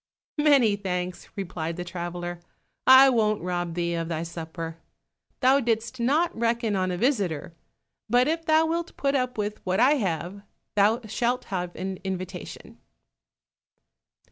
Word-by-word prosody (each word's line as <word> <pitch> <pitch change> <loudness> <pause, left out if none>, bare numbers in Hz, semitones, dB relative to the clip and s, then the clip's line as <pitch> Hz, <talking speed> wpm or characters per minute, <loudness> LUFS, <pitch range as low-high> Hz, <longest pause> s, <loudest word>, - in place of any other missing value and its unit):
"Many 275 -8 +5
thanks," 180 -2 -4
replied 170 -4 -4
the 180 - -3
traveler, 175 0 -5 0.5
"I 260 +1 +10
won't 215 -4 +1
rob 175 -2 -2
thee 170 -1 -1
of 165 -1 -2
thy 165 -1 -2
supper; 165 0 -6 0.6
thou 265 +2 +5
didst 235 0 -1
not 305 +9 +2
reckon 230 -2 0
on 185 -1 0
a 180 - -2
visitor, 190 - 0 0.6
but 245 +3 +4
if 325 +1 0
thou 315 0 +4
wilt 335 +1 -3
put 275 0 +1
up 255 -3 -1
with 210 0 -3
what 185 +2 0
I 280 +5 +5
have, 185 - -3 0.3
thou 210 +4 +3
shalt 240 +4 -1
have 180 -1 -3
an 190 0 -4
invitation." 185 -1 -6
200 Hz, 140 wpm, -26 LUFS, 175-250 Hz, 0.6 s, I